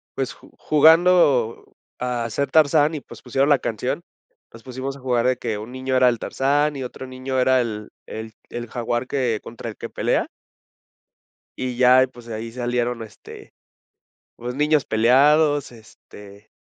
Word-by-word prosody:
pues, - - -3
ju - - -19
jugando 155 -6 +4 0.3
a 120 -2 -2
ser 140 +5 -2
Tarzán 155 0 +4
y, 150 - -5
pues, - - -13
pusieron 135 +3 0
la 145 - +5
canción, 125 +8 -3 0.5
nos 115 - -14
pusimos 130 +1 -5
a - - -14
jugar 125 -2 0
de 130 -1 +1
que 115 -4 -3
un 110 +3 -8
niño 130 0 -3
era 130 -1 +5
el 120 -2 -2
Tarzán 145 +5 0
y 135 - -5
otro 130 +1 -8
niño 130 +1 -3
era 130 0 +4
el 105 -2 -5 0.2
el 110 0 -8 0.2
el 120 -1 -6
jaguar 120 +1 -3
que 125 -6 -1
contra 115 0 -8
el 110 - -9
que - - -7
pelea - - 0 1.3
y 125 -1 -4
ya 130 +1 +6
y, - - -1
pues, 120 -2 -15
ahí 115 +1 -5
salieron 120 -1 -2
este, 105 -2 -13 0.8
pues, 125 +2 -6
niños 150 0 +2
peleados 145 +6 +3
este 105 -2 -15
125 Hz, 165 wpm, -22 LUFS, 115-135 Hz, 1.3 s, ya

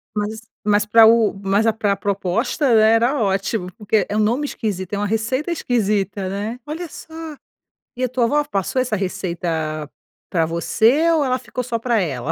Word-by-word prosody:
Mas 210 +1 -3 0.2
mas 210 0 +3
para 220 +1 +7
o 225 -1 +5
mas 200 +3 +2
a 225 - +3
pra 205 -2 0
proposta, 205 - 0
né, 220 0 +6
era 240 +5 +2
ótimo, 195 -1 -1
porque 210 -2 +1
é 205 - -4
um - - +2
nome 235 +7 +1
esquisito, 205 -8 -4
é - - 0
uma 205 0 -1
receita 225 - -1
esquisita, 205 - -1
né, 205 +5 -4
olha 325 +3 -5
só, 320 - -12 0.8
e 255 - -3
a 250 - +1
tua 250 -1 +1
avó 295 +5 +2
passou 255 0 -1
essa 235 -4 -1
receita 170 -5 -3 0.4
pra 165 -3 +1
você 230 - +2
ou 315 -3 +3
ela 255 -1 0
ficou 250 - -5
só 235 -2 -2
pra 230 -1 +1
ela? 135 -9 -2
215 Hz, 185 wpm, -20 LUFS, 195-245 Hz, 0.8 s, para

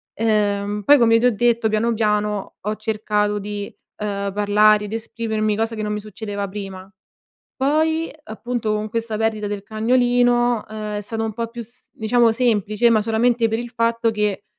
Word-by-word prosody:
Ehm, 205 -2 0
poi 290 - +7
come 230 -1 +5
ti 240 - +1
ho 245 -3 +3
detto 235 0 +2
piano, 215 +2 +1
piano 210 -2 -1
ho 210 +2 -2
cercato 210 -1 -1
di, 205 0 -6 0.2
ehm, 200 -1 -3
parlare 210 +1 +4
ed 210 - -7
esprimermi, 220 -1 -2
cosa 225 +1 -1
che 215 - -4
non 210 0 -2
mi 210 - -2
succedeva 205 -1 -5
prima. 195 -1 -7 0.7
Poi 315 +4 +1
appunto, 225 0 -3
con 215 0 -2
questa 225 0 -3
perdita 220 -1 0
del 205 -1 -4
cagnolino, 245 +1 +2
ehm, 215 -1 -5
è - - -3
stato 225 +2 -3
un 220 - -3
po' 230 +2 -3
più 235 0 -7 0.3
diciamo 230 +1 +2
semplice 225 -1 +2
ma 220 -2 +4
solamente 230 +1 +2
per 225 - -1
il 240 0 -7
fatto 230 0 +1
che 210 -2 -1
220 Hz, 175 wpm, -21 LUFS, 210-230 Hz, 0.7 s, poi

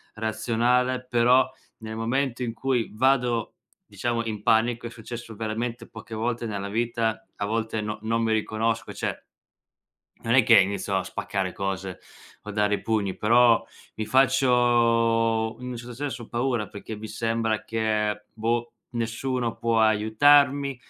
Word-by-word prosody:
razionale, 120 +3 0
però 125 +2 +4 0.3
nel 110 -1 -7
momento 125 +2 -1
in 115 - -3
cui 125 -1 -1
vado, 125 -2 +1 0.3
diciamo 120 -1 -2
in 110 -2 -4
panico, 115 +1 +2
è - - -7
successo 115 0 -9
veramente 115 +2 -4
poche 110 0 -9
volte 120 +1 -2
nella 100 -2 -4
vita, 115 0 -1
a 100 - -3
volte 110 0 -2
no 105 0 -4
non 115 +1 0
mi 110 - +1
riconosco 110 +1 -1
cioè - - -4 1.0
non 115 +1 0
è 130 - +7
che - - +7
inizio 100 0 -1
a 95 - 0
spaccare 95 -1 -3
cose 95 -1 -4 0.4
o 105 - -12
a - - -6
dare 105 0 +1
i - - -3
pugni, 105 -4 -1
però, 115 +1 +4 0.3
mi 110 - -3
faccio, 115 -3 +3
in 125 - -6
un 125 - -5
certo 120 +1 -8
senso 130 -2 -5
paura, 120 -2 -1
perché 105 +2 -8
mi 110 +1 -7
sembra 115 0 -1
che 105 -2 -1
boh, 115 +2 -1 0.2
nessuno 120 +1 -2
può 115 -1 +1
aiutarmi, 135 +6 +4
115 Hz, 150 wpm, -25 LUFS, 110-120 Hz, 1.0 s, è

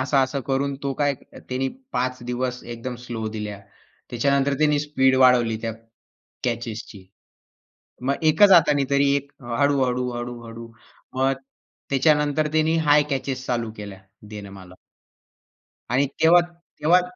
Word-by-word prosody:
असं-असं 135 +1 +1
करून 140 +1 0
तो 140 - -1
काय 145 -1 +2
त्यांनी 130 +1 -4 0.2
5 130 0 -1
दिवस 125 +1 -3
एकदम 120 +2 -6
स्लो 115 -3 -4
दिल्या. 105 -2 -5 0.5
त्याच्यानंतर 140 +3 +1
त्यानी 150 -1 +3
स्पीड 130 -3 +2
वाढवली 125 -3 +4
त्या 115 -1 -2 0.7
कॅचेसची. 115 -5 -4 1.0
मग 135 +2 +1 0.2
एकच 200 +6 +6
हाताने 150 -5 +5
तरी 140 0 +3
एक 140 0 -6 0.3
हळू-हळू, 130 -3 +1
हळू-हळू. 120 -1 -7 0.5
मग 135 +1 +2 0.6
त्याच्यानंतर 150 +2 +2
त्यांनी 155 +1 +2
हाय 145 0 +6
कॅचेस 135 -1 -3
चालू 120 -2 -1
केल्या, 100 -2 -8 0.3
देणं 105 -2 -8
मला. 95 -2 -12 1.2
आणि 130 +4 +2
तेव्हा 170 +2 +7
तेव्हा 170 0 +1
130 Hz, 120 wpm, -23 LUFS, 120-145 Hz, 1.2 s, तेव्हा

